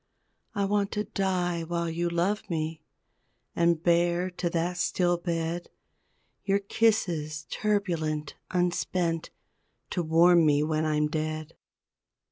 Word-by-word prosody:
I 200 - +1
want 200 0 +1
to 210 - 0
die 185 -4 -1
while 170 +1 -2
you 170 +1 -1
love 180 +5 -1
me, 160 -1 -2 0.7
And 170 -1 +2
bear 175 +1 +2
to 175 -1 -2
that 175 +1 -1
still 175 0 +2
bed, 170 0 -3 0.7
Your 195 0 +2
kisses 175 -8 0
turbulent, 165 -8 -1 0.2
unspent 175 -2 0 0.6
To 180 - 0
warm 170 +1 +5
me 150 -1 +4
when 155 0 0
I'm 150 -1 +2
dead. 155 0 -3
170 Hz, 115 wpm, -28 LUFS, 160-180 Hz, 0.7 s, warm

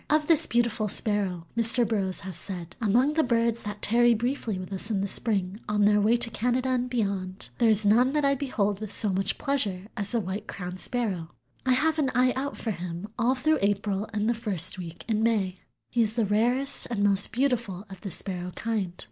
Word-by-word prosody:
Of 305 0 +2
this 320 -1 +5
beautiful 235 -2 0
Sparrow 195 -5 +1
Mr. 230 +1 +3
Burroughs 195 -4 -1
has 190 -2 -6
said: 175 -2 -6
"Among 240 +7 +3
the 320 - +3
birds 235 -3 +1
that 210 -1 -7
tarry 240 +1 +4
briefly 235 -2 -2
with 185 +1 -7
us 195 +3 -3
in 205 -3 0
the 200 - -1
spring 200 -2 +1
on 210 -1 +2
their 210 0 +4
way 220 +3 +4
to 235 -1 +2
Canada 250 +4 0
and 250 -1 0
beyond, 195 -5 -3
there 235 -2 +4
is 215 -1 +3
none 245 +6 +4
that 300 -1 +1
I 275 - +4
behold 215 -8 -1
with 215 -2 -5
so 210 0 0
much 195 +1 -1
pleasure 210 -10 -1
as 205 -3 -3
the 235 - +1
White 190 0 -5
crowned 180 -1 -6
Sparrow. 195 -10 0 0.4
I 255 - +5
have 315 +5 +1
an 275 -3 +1
eye 255 0 +3
out 280 +2 -3
for 225 - -3
him 175 +1 -6
all 245 +3 +2
through 310 +3 +1
April 200 0 -1
and 210 0 -1
the 235 - +3
first 190 -5 +3
week 170 -1 -9
in 220 -2 0
May. 200 -5 0 0.3
He 240 - +2
is 220 -1 0
the 230 -3 +1
rarest 245 +7 0
and 215 -4 -1
most 200 -1 +4
beautiful 235 -7 -1
of 190 -2 -12
the 200 - -5
sparrow 180 -1 -3
kind. 210 -6 -2
215 Hz, 215 wpm, -26 LUFS, 195-240 Hz, 0.4 s, this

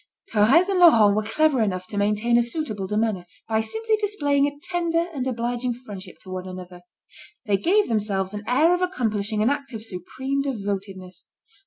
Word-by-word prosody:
Thérèse 240 - +5
and 390 -2 +1
Laurent 225 - +7
were 215 - +2
clever 265 +4 +1
enough 185 -4 -1
to 205 - -9
maintain 210 +3 +1
a 240 - +5
suitable 235 -6 -3
demeanour, 210 -2 -1 0.2
by 220 0 +1
simply 445 - -1
displaying 290 -10 +1
tender 340 -2 0
and 265 -3 -3
obliging 240 0 -2
friendship 205 -6 -10
to 185 - -11
one 185 0 -5
another. 180 -1 -9 0.6
They 205 -2 +2
gave 395 - +2
themselves 205 -3 -1
an 205 0 -5
air 300 +8 +4
of 355 - 0
accomplishing 215 - -1
an 240 - +3
act 280 -2 -4
of 220 -1 -6
supreme 260 +8 -3
devotedness. 195 -7 -5
225 Hz, 170 wpm, -24 LUFS, 205-285 Hz, 0.6 s, Laurent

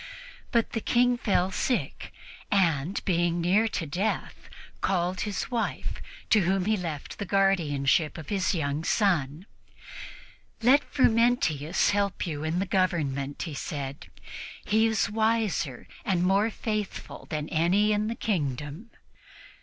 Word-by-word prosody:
But 235 -2 +1
the 225 - -2
King 245 +2 +3
fell 190 -5 +1
sick 250 +6 -2 0.4
and, 170 -2 +1
being 175 -1 +1
near 190 +6 +3
to 185 -6 -3
death, 185 +9 -3 0.3
called 185 -1 0
his 210 +3 -3
wife, 235 -2 -2 0.3
to 215 - +6
whom 190 0 +1
he 215 - +1
had 210 -4 +1
left 155 -5 -6
the - - -2
guardianship 165 -7 +2
of 160 -3 -8
his 195 -1 +1
young 145 -1 -1
son. 170 -5 +1 1.2
"Let 265 +5 +6
Frumentius 230 - +2
help 200 -1 0
you 155 -3 -4
in 160 +2 -1
the 190 - 0
government," 150 -8 -1
he 160 - -5
said; 140 0 -5 0.6
"he 220 +2 +3
is 220 -3 +1
wiser 220 - 0 0.2
and 180 -3 +1
more 195 +4 +3
faithful 215 -2 -4
than 150 -2 -3
any 185 +7 +3
in 210 0 +1
the 230 - -2
kingdom." 150 - -3
185 Hz, 135 wpm, -27 LUFS, 155-215 Hz, 1.2 s, to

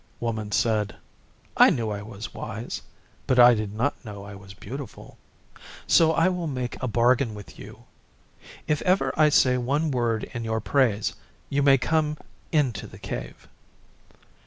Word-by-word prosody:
Woman 110 -3 -3
said, 105 -1 +1 0.6
'I - - +8
knew 115 -4 -1
I 100 -1 -4
was 105 +1 -8
wise, 110 +2 -6 0.5
but 130 - +2
I 120 0 +9
did 105 -3 -3
not 125 +9 -2
know 100 -4 -8
I 100 0 -9
was 95 0 -12
beautiful. 130 +8 -9 0.7
So 160 -1 +5
I 165 +2 +3
will 180 -2 -1
make 125 -4 -4
a 130 - -1
bargain 120 0 +2
with 105 -1 -12
you. - - -12 0.8
If 150 -1 0
ever 185 +1 +1
I 155 -1 +5
say 125 -3 +4
one 145 +5 0
word 120 -3 0
in 120 -2 -4
your 110 0 -1
praise 110 -4 +1 0.4
you 140 0 +1
may 135 -1 +6
come 150 +3 0 0.3
into 140 - 0
the - - -13
Cave. - - -7
120 Hz, 160 wpm, -25 LUFS, 110-140 Hz, 0.8 s, I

